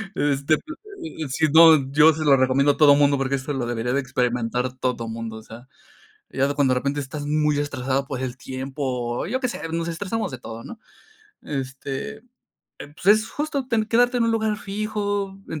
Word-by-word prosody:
este, 145 +1 +1
p - - -14
eh 365 - -9
eh, - - -5
si 155 +4 +1
no, 160 -5 +7
yo 150 +2 +6
se 155 +1 -4
lo 140 -2 +6
recomiendo 130 +2 +3
a - - -12
todo 145 -2 +7
mundo, 140 -1 +3
porque 135 0 0
esto 135 +2 -4
lo 130 -3 -2
debería 120 0 -2
de 140 - +2
experimentar 125 -1 -1
todo 125 -3 -2
mundo, 115 -1 -6
o 110 - -11
sea. 115 +4 -12 0.6
Ya 135 +2 0
cuando 135 -3 +2
de 125 - 0
repente 140 +1 -2
estás 145 +2 -6
muy 150 0 +1
estresado 135 -1 -1
por 130 -2 -5
el 130 -1 -4
tiempo, 130 +2 -6 0.4
o - - -4
yo 260 +5 -2
qué 250 - 0
sé, - - -6
nos 165 0 -2
estresamos 200 +3 -3
de 130 - -6
todo, 115 -1 -9
¿no? 235 - -9 0.6
Este, 135 - -5 0.6
pues, 150 +5 -11
es 215 +2 +5
justo 290 -3 -3
ten 225 -2 +1
quedarte 245 +2 +3
en 230 - +2
un 230 - +2
lugar 220 -2 0
fijo, 205 -1 -3
en 155 - -5
145 Hz, 205 wpm, -23 LUFS, 130-200 Hz, 0.6 s, no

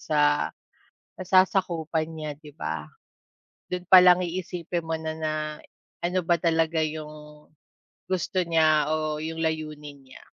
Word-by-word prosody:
sa 150 -1 +2 0.7
nasasakupan 175 -4 +1
niya, 155 -2 -6
'di 150 0 -14
ba? 80 -1 -3 0.8
Dun 180 0 -4
pa 185 - +10
lang 180 0 +7
iisipin 175 -1 -4
mo 165 - -3
na 160 0 -3
na 155 -1 -2 0.7
ano 180 +1 +1
ba 170 0 +2
talaga 160 -1 +1
yung 150 -1 -9 0.6
gusto 185 0 -2
niya 155 -2 +3
o 155 -1 -1
yung 160 +1 -5
layunin 150 -3 -4
niya? 130 - -14
160 Hz, 130 wpm, -26 LUFS, 150-170 Hz, 0.8 s, pa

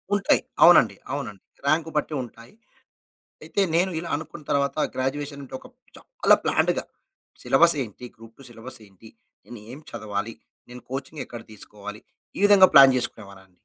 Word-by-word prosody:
ఉంటాయి. 200 - +2 0.2
అవునండి. - - +6 0.2
అవునండి 100 -2 -6 0.2
రాంక్ 160 +2 +1
బట్టి 150 +1 -2
ఉంటాయి. 115 - -14 0.9
అయితే 200 - -3
నేను 185 +3 +2
ఇలా 170 - -6
అనుకున్న 155 +1 -10
తరువాత 140 +1 0 0.2
గ్రాడ్యుయేషన్ 140 +2 -3
అంటే 130 0 -8 0.4
చాలా - - +2
ప్లాన్డ్‌గా - - +1 0.6
సిలబస్ 170 -1 +4
ఏంటి? 120 +2 -10
గ్రూప్ 115 0 -16
టూ - - -14
సిలబస్ 120 +2 -8
ఏంటి? 100 +3 -18 0.4
నేను 120 -1 -11
ఏం 135 - -9
చదవాలి? 105 +1 -5 0.3
నేను 125 0 -11
కోచింగ్ 135 +3 -6
ఎక్కడ 120 -1 -9
తీసుకోవాలి? 105 0 -9 0.4
ఈ - - -4
విధంగా 195 -2 +7
ప్లాన్ 135 -1 +9
చేసుకునేవానండి. 100 -5 -2
130 Hz, 140 wpm, -24 LUFS, 110-155 Hz, 0.9 s, ప్లాన్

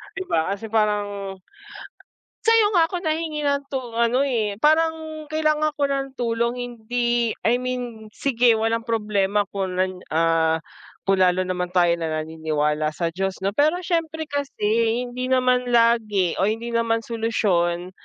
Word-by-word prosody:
'di 385 - -3
ba, 160 +1 +2
kasi 220 +2 -9
parang 205 -2 0 1.1
sa'yo 455 -1 +5
nga 330 -2 +4
ako 360 - -3
nahingi 310 -1 -1
ng 280 0 +1
tu 270 - -1 0.2
ano, 235 +3 +2
eh, 215 -6 -1
parang 315 0 +1
kailangan 305 -1 +1
ko 285 - 0
ng 275 -1 -1
tulong 235 0 0
hindi 240 -1 -1
I 240 +2 +3
mean 245 -4 -5
sige 240 0 +2
walang 225 +1 0
problema 210 -2 +1
kung 190 -2 -2
nan, 185 0 -1
ah, 160 0 +2 0.5
kung 195 -1 +2
lalo 185 0 +3
naman 180 -1 -2
tayo 175 -2 +3
na 160 - -1
naniniwala 155 -1 -1
sa 170 -1 -1
Diyos 190 +1 -2
'no, 200 - 0
pero 305 - +3
siyempre 320 -2 -1
kasi 235 -5 0
hindi 250 +1 -4
naman 250 -1 +2
lagi 225 -6 +3
o 195 - +3
hindi 230 +2 -3
naman 230 -1 +1
solusyon 185 -6 0
230 Hz, 150 wpm, -23 LUFS, 195-270 Hz, 1.1 s, sa'yo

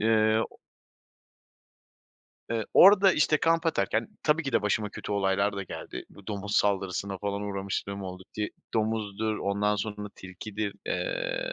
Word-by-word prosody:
Eee, 110 0 +4
o - - -18 1.9
eee 115 -2 0
orada, 195 0 +8
işte 155 0 +3
,kamp 165 0 +2
atarken, 165 - +1
tabii 155 +2 +3
ki 135 -3 -3
de - - +3
başıma 105 0 +1
kötü 105 - -6
olaylar 100 0 +1
da 100 - -2
geldi. - - -7
Bu 100 - -16
domuz 105 -1 -2
saldırısına 95 -1 0
falan 100 +1 -2
uğramışlığım 100 0 -3
oldu. 95 0 -7
Ti 105 -1 -1 0.3
domuzdur, 110 -1 0
ondan 105 +1 +1
sonra 105 0 -4
tilkidir. 100 +2 -5
Eee, - - -2
105 Hz, 140 wpm, -28 LUFS, 100-115 Hz, 1.9 s, orada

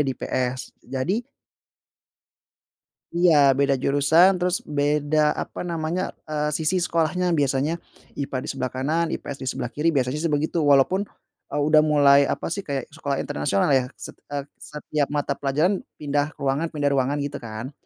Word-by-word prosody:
di 135 -3 0
IPS. 130 0 -3 0.2
Jadi 160 - -1 2.0
Iya, 150 -6 +5
beda 140 -1 +3
jurusan, 160 +7 +5
terus 180 0 0 0.2
beda 150 +1 +2
apa - - -7
namanya, 170 +1 -2 0.2
eee, 150 0 -1
sisi 160 +3 0
sekolahnya, 175 +1 0
biasanya 140 +3 +1 0.5
IPA 135 -1 -3
di - - -7
sebelah 130 -2 -2
kanan, 155 +6 0
IPS 140 - -7
di 130 - -5
sebelah 120 -2 -3
kiri, 150 +3 -1
biasanya, 130 +2 0
sih, 165 - 0
begitu, 155 +3 -1
walaupun, 140 +8 +4 0.5
eee, - - -7
udah 155 0 +6
mulai 140 -1 +6
apa, - - -3
sih, 200 - -2
kayak 140 -3 -2
sekolah 145 -2 -3
internasional, 100 - 0
ya, 130 -2 +3
set - - -8 0.2
eee, 145 -1 -3 0.2
setiap 150 -1 -3
mata 145 -1 -2
pelajaran 155 +8 +1 0.2
pindah 145 +1 -1
ruangan 140 +4 -1
pindah 145 -3 -1
ruangan, 135 +1 +1
gitu, 145 0 -5
kan. 115 +3 -7
145 Hz, 155 wpm, -24 LUFS, 135-160 Hz, 2.0 s, udah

